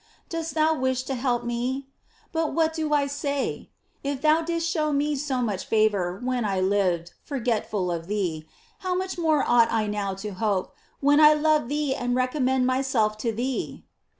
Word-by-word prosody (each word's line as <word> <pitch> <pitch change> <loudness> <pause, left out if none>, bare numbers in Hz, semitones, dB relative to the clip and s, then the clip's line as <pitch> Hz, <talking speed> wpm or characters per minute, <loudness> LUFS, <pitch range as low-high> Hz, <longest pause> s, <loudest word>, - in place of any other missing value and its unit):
Dost 330 -1 -4
thou 315 0 +3
wish 260 -3 0
to 270 - -4
help 245 -1 0
me? 245 +3 -2 0.5
But 325 -2 -1
what 320 -1 +2
do 315 -2 -2
I 290 -1 +3
say? 280 0 -3 0.3
If 280 -1 -2
thou 310 +1 +4
didst 335 0 -1
show 310 -3 0
me 290 +1 +1
so 265 -3 -1
much 205 -5 -2
favor 200 -4 +1
when 250 -1 0
I 195 -3 0
lived 185 -3 +1
forgetful 220 -8 -1
of 165 -1 -4
thee, 175 -7 -2 0.3
how 370 -1 -1
much 370 -1 -3
more 315 -4 +2
ought 235 -1 +5
I 220 -1 +1
now 205 -2 -2
to 200 +2 -6
hope, 195 -1 -1 0.3
when 290 +1 +5
I 305 0 +8
love 305 -4 +2
thee 295 -2 0
and 245 -2 -1
re 255 0 +3
commend 260 -1 +1
myself 255 -5 +1
to 230 +1 0
thee 245 +4 -3
255 Hz, 180 wpm, -25 LUFS, 215-300 Hz, 0.5 s, I